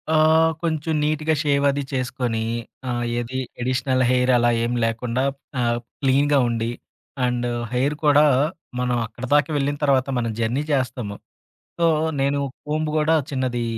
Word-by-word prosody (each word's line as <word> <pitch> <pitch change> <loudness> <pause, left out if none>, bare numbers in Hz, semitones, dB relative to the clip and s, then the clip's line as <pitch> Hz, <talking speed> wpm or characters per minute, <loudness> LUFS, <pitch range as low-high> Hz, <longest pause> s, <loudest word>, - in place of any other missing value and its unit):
ఆహ్, 160 +1 +5
కొంచెం 160 -1 -1
నీట్‌గా 155 +1 +1
షేవ్ 140 -2 +1
అది 140 +1 0
చేసుకొని 125 -3 -1 0.5
ఆ! - - 0 0.3
ఏది 120 +2 -4 0.2
ఎడిషనల్ 130 +1 +1
హెయిర్ 125 0 +3
అలా 120 0 +3
ఏమి 120 +1 -1
లేకుండా 115 +3 -1 0.4
ఆహ్, 120 0 +1 0.2
క్లీన్‌‌గా 140 +2 +3
ఉండి 115 0 -1 0.6
అండ్ 120 0 -1 0.3
హెయిర్ 140 +4 +1
కూడా, 150 +1 +6 0.5
మనం 125 -1 0
అక్కడి 120 +4 -8
దాకా 145 +2 +4
వెళ్ళిన 145 +1 -1
తర్వాత 135 -2 +3
మనం 115 -1 -1
జర్నీ 120 +6 0
చేస్తాము. 125 -6 -1 0.6
సో 170 - +3 0.3
నేను 140 +1 +1 0.3
కొంబ్ 155 +1 -1
గూడా 155 +1 +3
చిన్నది 130 -3 -1
130 Hz, 140 wpm, -22 LUFS, 120-145 Hz, 0.6 s, కూడా